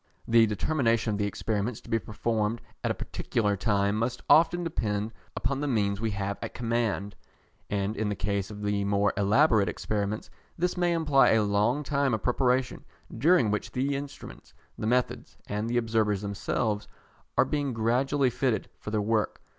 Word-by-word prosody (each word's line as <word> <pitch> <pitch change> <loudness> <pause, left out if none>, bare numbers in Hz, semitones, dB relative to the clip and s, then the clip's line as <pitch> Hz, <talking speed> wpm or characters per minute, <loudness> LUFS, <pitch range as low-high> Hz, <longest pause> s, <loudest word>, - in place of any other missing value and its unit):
The 115 -1 +5
determination 115 0 +1
of 100 - -3
the 105 - +1
experiments 105 +2 -2
to - - -15
be 115 - +3
performed 110 +1 -1 0.2
at - - 0
a - - 0
particular 105 -3 -1
time 100 0 +1
must 120 +3 -2
often 170 +2 +5
depend 110 -9 -2 0.2
upon 140 -1 -1
the 145 - -1
means 100 -5 0
we 115 - 0
have 100 0 -3
at - - -6
command, 115 -4 -1 0.5
and 100 +1 -1
in 110 -2 -1
the 105 - -1
case 100 0 -2
of 105 -1 -8
the 105 -1 0
more 100 0 +2
elaborate 105 +2 +4
experiments, 105 0 -3 0.3
this 180 +1 0
may 175 -1 +1
imply 150 -5 +4
a 110 -1 +4
long 105 +8 +1
time 140 -4 +1
of 110 - -6
preparation, 125 0 +1 0.3
during 130 - +4
which 105 - -3
the 135 +2 0
instruments, 140 +1 -8 0.2
the 110 - -3
methods, 125 +1 -1
and 105 +2 -3
the 120 - 0
observers 110 -3 +1
themselves, 105 +1 -2 0.5
are - - +5
being 145 0 -1
gradually 125 +4 +1
fitted 125 -2 -1
for - - -7
their 105 0 0
work. 110 0 0
110 Hz, 170 wpm, -28 LUFS, 105-130 Hz, 0.5 s, The